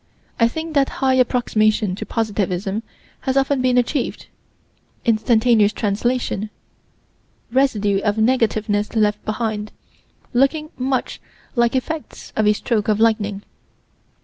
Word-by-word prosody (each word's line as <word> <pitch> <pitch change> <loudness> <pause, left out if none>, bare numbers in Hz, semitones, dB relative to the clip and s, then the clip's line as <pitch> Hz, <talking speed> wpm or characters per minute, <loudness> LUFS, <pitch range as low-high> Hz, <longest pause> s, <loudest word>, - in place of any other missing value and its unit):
I 230 - +5
think 320 +6 -5
that 280 -2 +3 0.2
high 260 - +4
approximation 215 -5 +2
to 190 - -6
positivism 205 -2 -1 0.4
has 265 0 -1
often 275 0 +2
been 250 -1 +2
achieved 250 +2 -1 0.8
instantaneous 225 -1 +3
translation 215 +1 -1 1.0
residue 210 -7 +2
of 205 0 +1
negativeness 220 -3 +1
left 210 -1 +1
behind, 215 -1 -2 0.6
looking 300 +5 +1
much 260 0 -2 0.3
like 235 +1 +2
effects 310 +4 -4
of 215 -1 +2
a 210 - +5
stroke 215 -1 -1
of 215 -1 +2
lightning. 210 -3 +1
225 Hz, 115 wpm, -20 LUFS, 210-255 Hz, 1.0 s, I